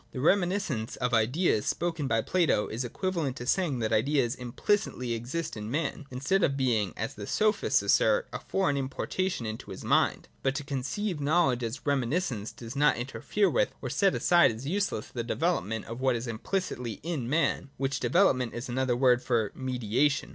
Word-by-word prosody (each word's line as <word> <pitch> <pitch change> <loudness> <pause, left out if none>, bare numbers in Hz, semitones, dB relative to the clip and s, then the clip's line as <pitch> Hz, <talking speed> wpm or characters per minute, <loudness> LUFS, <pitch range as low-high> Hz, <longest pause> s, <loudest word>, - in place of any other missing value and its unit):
The 130 - -4
reminiscence 175 - +1
of 125 -1 -2
ideas 115 - +2
spoken 165 -3 -1
of - - -2
by 115 0 +2
Plato 170 - +2
is 115 +4 -4
equiva 185 +9 -3
lent 140 -6 -1
to 120 - -7
saying 155 -1 +1
that 110 - 0
ideas 125 +1 +2
implicitly 125 - -1
exist 135 +8 -4
in 105 0 -6
man, 150 +1 -2
instead 135 +10 0
of 140 -5 +2
being, 115 -7 +1
as 110 - -3
the 100 -1 -8
Sophists 215 0 +2
assert, - - +3
a - - -3
foreign 185 -8 0
importation 135 +3 -2
into 110 0 -6
his - - -8
mind. - - +2
But 135 0 0
to 145 - -3
conceive 145 +6 -3
knowledge 140 -5 +2
as 115 +3 -4
reminiscence 135 - 0
does 115 +2 -9
not 150 +1 +3
interfere 135 - 0
with, - - +1
or - - -5
set 195 -2 +2
aside 175 -1 +5
as 115 +4 -8
useless, 185 - -1
the 120 - -2
development 115 - -1
of 115 +3 -7
what 130 -2 +2
is 115 +1 -3
implicitly 120 - -3
in 150 -8 -3
man; 150 -2 +1
— - - -35
which 135 0 -1
development 130 -10 +2
is 120 +2 -5
another 130 0 0
word 125 -1 +4
for 115 -5 0
mediation. 130 +3 0
135 Hz, 185 wpm, -29 LUFS, 120-170 Hz, -, aside